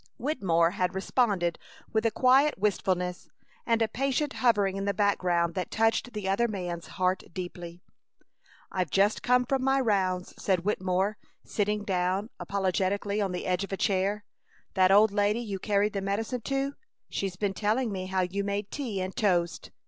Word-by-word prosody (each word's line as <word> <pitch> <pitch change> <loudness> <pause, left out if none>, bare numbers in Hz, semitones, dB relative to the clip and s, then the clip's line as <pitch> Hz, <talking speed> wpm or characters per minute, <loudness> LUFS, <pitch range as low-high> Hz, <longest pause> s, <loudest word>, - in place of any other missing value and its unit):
Wittemore 180 - +1
had 185 -1 -1
responded 190 -4 +1 0.3
with 220 +1 +2
a - - +3
quiet 265 +6 +4
wistfulness 185 -3 -1 0.4
and 230 -1 +3
a - - +1
patient 275 +5 -1
hovering 205 -6 +2
in 195 0 -3
the 200 - 0
background 180 -4 +1
that 180 0 -3
touched 225 +2 +1
the 210 -3 -4
other 200 +5 +2
man's 175 -5 -5
heart 185 0 +1
deeply. 175 -1 -7 0.9
"I've 185 -4 -1
just 200 +5 +2
come 250 0 +3
from 265 +1 0
my 270 +1 +3
rounds," 190 -6 0
said 185 -3 +1
Wittemore, 190 0 0 0.3
sitting 210 0 -1
down, 190 +2 -1
apologetically, 200 +2 -1
on 195 -2 0
the 180 - -4
edge 180 +1 0
of 195 - -7
a 195 - -2
chair. 200 +1 0 0.5
"That 185 -1 +4
old 205 +2 +6
lady 205 +2 +1
you 205 -5 -4
carried 205 +1 +1
the 200 - -2
medicine 220 +5 -2
to 275 0 -1 0.3
she's 195 -2 -3
been 195 +1 -1
telling 220 +4 0
me 185 -1 -4
how 190 0 0
you 190 +2 -1
made 200 0 -3
tea 230 -9 -3
and 185 +1 -4
toast!" 180 -7 0
200 Hz, 170 wpm, -28 LUFS, 185-220 Hz, 0.9 s, old